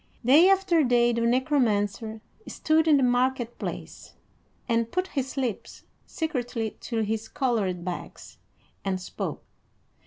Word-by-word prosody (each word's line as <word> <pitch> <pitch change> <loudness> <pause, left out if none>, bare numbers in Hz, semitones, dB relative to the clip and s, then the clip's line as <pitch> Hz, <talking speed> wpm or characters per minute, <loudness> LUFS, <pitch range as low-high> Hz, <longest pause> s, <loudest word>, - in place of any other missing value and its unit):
Day 305 +9 +7
after 380 -4 +3
day 240 -2 +3
the 235 - -1
Necromancer 230 -4 0 0.3
stood 315 0 +1
in 300 -2 +6
the 270 - +2
market 245 -1 +1
place, - - -7 0.5
and 230 -1 0
put 365 +1 -1
his 270 -1 -4
lips 250 -6 -4 0.2
secretly 245 -8 -3
to 230 -2 -2
his 220 +1 -2
colored 205 -10 -1
bags, 180 -1 -7 0.4
and 190 -1 -1
spoke. 185 - -5
245 Hz, 125 wpm, -26 LUFS, 220-280 Hz, 0.5 s, Day